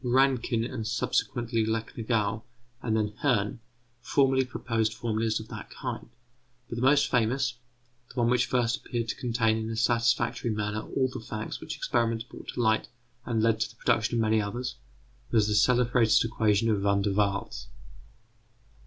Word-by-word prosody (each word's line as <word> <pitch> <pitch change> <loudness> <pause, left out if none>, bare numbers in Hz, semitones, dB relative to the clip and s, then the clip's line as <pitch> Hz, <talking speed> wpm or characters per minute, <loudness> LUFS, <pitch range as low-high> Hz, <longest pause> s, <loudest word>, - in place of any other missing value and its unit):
Rankin 125 -2 +2
and, 115 -2 -4
subsequently, 120 -1 0
Recknagel, 110 -1 -1 0.4
and 110 -2 0
then 105 -1 -1
Hirn, 115 -7 +1 0.4
formerly 135 0 +2
proposed 115 -3 -1
formulas 110 -1 -1
of 110 - -9
that - - -8
kind; - - -6 0.6
but 115 - -6
the - - -2
most 140 +3 +5
famous, 125 +1 +1 0.5
the - - -5
one 120 - +3
which 125 0 +2
first 120 -2 +1
appeared 115 -2 -4
to - - -1
contain 115 -3 +1
in 110 0 -3
a 115 - -3
satisfactory 115 +1 +1
manner 105 0 -1
all 130 +3 0
the - - -5
facts 110 -1 -6
which - - -5
experiments 115 -1 0
brought 120 - -13
to - - -5
light 110 -1 +2 0.4
and 115 -2 +1
led 115 -1 +3
to 110 - 0
the - - -17
production 110 +2 +1
of 115 - +2
many 110 0 +3
others, 120 +5 -4 0.5
was 110 -2 +3
the 105 - 0
celebrated 120 0 +4
equation 110 0 +2
of 105 -2 +1
Van 100 0 +2
der 100 - +1
Waals. 100 -13 -1
115 Hz, 165 wpm, -28 LUFS, 110-120 Hz, 0.6 s, most